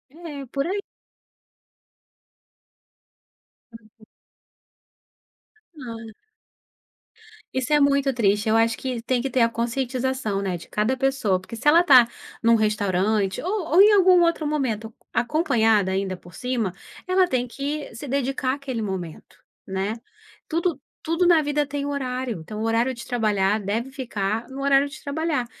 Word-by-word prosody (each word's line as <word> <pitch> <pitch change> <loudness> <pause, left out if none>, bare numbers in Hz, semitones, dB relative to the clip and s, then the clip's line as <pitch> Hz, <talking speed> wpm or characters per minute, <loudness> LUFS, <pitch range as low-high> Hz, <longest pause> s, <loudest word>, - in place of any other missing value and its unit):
É, 300 -5 -8
por 275 +4 -2
aí. 400 +3 -2 3.0
Uhum. 215 0 -22 1.7
Ah. 230 -3 -8 1.4
Isso 260 +2 -1
é 295 - +5
muito 280 -1 +3
triste, 210 -2 +1
eu 220 - +3
acho 230 0 +2
que 255 -3 -4
tem 245 +1 0
que 270 - -2
ter 255 0 +1
a 230 - +4
conscientização, 240 -2 -2
né, 190 -2 -2
de 170 - -10
cada 215 +5 0
pessoa, 260 -8 +1
porque 205 +5 -9
se 260 - -4
ela 330 +4 +7
está 260 -9 +7 0.3
num 230 0 +5
restaurante 205 -2 0
ou 400 +4 -1
ou 365 - +8
em 420 - +7
algum 370 -2 +6
outro 335 -2 +1
momento 230 -7 -2 0.2
acompanhada 230 - +2
ainda 190 0 -1
por 175 -1 -16
cima, 235 -2 -2 0.3
ela 370 0 +3
tem 255 -5 0
que 285 +2 -4
se 230 +6 -8
dedicar 270 0 -1
aquele 265 -5 -4
momento, 185 -6 -6 0.3
né. 195 +3 -2 0.5
Tudo 335 +1 -1 0.2
tudo 330 +2 +1
na 340 -3 +6
vida 295 0 0
tem 285 0 -4
horário, 255 -6 -3
então 210 +7 -7
o - - -1
horário 230 +3 +1
de 235 - -9
trabalhar 215 -4 +1
deve 220 +6 -3
ficar 225 -4 -3
no 270 +1 -7
horário 275 0 +3
de 300 +1 -12
trabalhar. 295 -2 -1
250 Hz, 145 wpm, -24 LUFS, 215-285 Hz, 3.0 s, ou